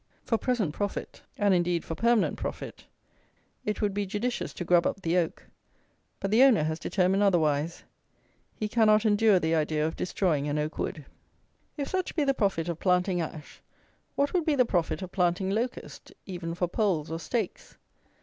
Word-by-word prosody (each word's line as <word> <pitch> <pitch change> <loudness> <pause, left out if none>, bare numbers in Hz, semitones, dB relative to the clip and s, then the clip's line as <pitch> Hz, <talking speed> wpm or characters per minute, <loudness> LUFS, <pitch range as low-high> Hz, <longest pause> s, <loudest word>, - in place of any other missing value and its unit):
For 230 - 0
present 225 - 0
profit, 205 +2 -4 0.2
and, 205 -2 +3
indeed, 175 -1 +1
for - - -4
permanent 230 +6 +2
profit, - - -6 0.8
it 210 0 -2
would 205 -1 +1
be 205 0 -2
judicious 225 +5 -2
to 175 - -5
grub 175 0 +4
up 195 - -4
the 165 +1 +1
oak; 175 -3 -1 0.7
but 195 - -2
the 225 +4 +5
owner 260 - +6
has 160 +1 -2
determined 190 +1 +1
otherwise. 165 -5 +1 0.7
He 215 - -2
cannot 215 -1 +4
endure 210 -1 +4
the 160 -2 0
idea 155 -1 +1
of 160 - -2
destroying 165 -6 0
an 145 +1 -1
oak 150 +1 -3
wood. 150 -4 -3 0.7
If 280 -2 -2
such 370 -1 -2
be 310 - +2
the 275 -1 +2
profit 195 -9 0
of 170 -2 -3
planting 180 -1 +2
ash, 155 -2 -8 0.5
what 285 +1 +1
would 360 -2 +2
be 310 -2 +1
the 250 -2 +4
profit 180 -2 -1
of 185 - -7
planting 180 +1 +1
locust, 235 +5 -4
even 175 -3 -5
for 180 0 0
poles 175 -6 0
or 165 - -3
stakes? 220 +1 -4
185 Hz, 180 wpm, -28 LUFS, 165-215 Hz, 0.8 s, owner